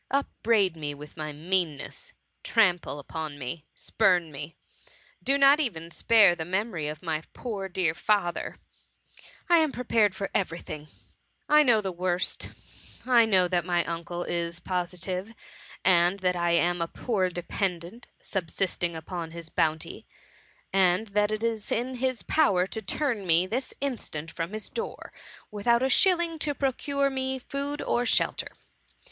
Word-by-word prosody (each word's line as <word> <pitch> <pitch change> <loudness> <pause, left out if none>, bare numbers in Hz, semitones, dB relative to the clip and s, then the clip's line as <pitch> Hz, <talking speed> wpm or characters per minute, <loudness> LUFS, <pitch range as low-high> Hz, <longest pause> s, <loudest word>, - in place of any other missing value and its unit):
Upbraid 225 -9 +1
me 145 -2 -4
with 150 +1 -11
my 155 -1 -4
meanness 170 - -2 0.2
— - - -48
trample 180 -9 +2
upon 150 +1 -6
me 145 +4 -6
— - - -48
spurn 180 -7 +2
me 145 +3 -7 0.7
—do 275 +1 +2
not 280 +2 +6
even 170 - -2
spare 210 -1 +5
the 170 -2 -4
memory 185 -2 -2
of 150 +2 -6
my 160 -2 -1
poor 200 -6 -5
dear 175 -3 0
father; 175 0 0 0.4
— - - -23 0.2
I 345 - +6
am 315 -3 +3
prepared 225 -6 +2
for 195 0 -4
every 170 -4 0
thing; 155 -3 -8 0.6
I 300 0 +6
know 240 -7 +4
the 190 -2 -3
worst; 180 0 -2 0.6
I 240 -2 +6
know 190 -4 +4
that 175 -1 +1
my 175 0 +1
uncle 170 +1 -4
is 170 0 -3
posi 180 -1 -3
tive, 190 +5 -4 0.5
and 175 0 +5
that 180 -1 +2
I 170 -1 +1
am 175 +1 +2
a 165 - 0
poor 190 -2 -1
dependant, 180 +4 -3 0.2
subsisting 175 -1 -2
upon 165 +1 -5
his 165 0 -8
bounty, 160 -2 -1 0.7
and 195 +2 +3
that 205 +1 +2
it 215 +1 -2
is 225 -2 -2
in 250 +2 -1
his 255 -1 -1
power 195 - +3
to 220 +3 -5
turn 220 -1 -1
me 170 +2 +4
this 245 +7 -3
instant 195 - -4
from 165 +1 -4
his 215 -1 -5
door, 465 0 -6 0.4
without 235 +4 +2
a 265 - +2
shilling 340 +1 +3
to 290 -1 -1
procure 275 +1 0
me 265 0 -2
food 280 +3 -4
or 245 0 0
shelter. - - +1
185 Hz, 160 wpm, -27 LUFS, 170-235 Hz, 0.7 s, not